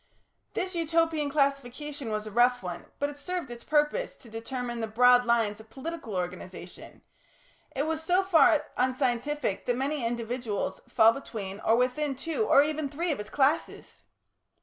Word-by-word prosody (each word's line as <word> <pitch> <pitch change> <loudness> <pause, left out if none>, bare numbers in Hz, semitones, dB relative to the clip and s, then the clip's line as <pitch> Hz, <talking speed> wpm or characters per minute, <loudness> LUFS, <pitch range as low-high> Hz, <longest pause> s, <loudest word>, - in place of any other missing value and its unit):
This 370 0 -2
Utopian 325 -2 +1
classification 280 -1 -1
was 215 0 -2
a 215 - -7
rough 245 +2 +3
one, 180 -1 -6
but 285 0 -1
it 290 - -13
served 355 -5 -4
its 235 -1 -9
purpose 300 +11 +1
to 230 - -16
determine 240 +1 -4
the 225 - -2
broad 245 +3 +5
lines 225 -3 +1
of 220 0 -14
political 270 - -6
organisation; 180 0 -7 0.7
it 280 +2 0
was 320 0 -2
so 360 +4 +2
far 335 -4 +5
unscientific 255 -2 0
that 245 -1 +1
many 275 +1 -1
individuals 235 -2 -3
fall 225 +1 +6
between 210 -6 -6
or 225 - +3
within 255 +4 0
two 330 - -2
or 280 - +7
even 305 -1 -2
three 330 +5 -1
of 285 - -2
its 210 +1 -6
classes. 290 +6 -1
260 Hz, 160 wpm, -28 LUFS, 230-300 Hz, 0.7 s, or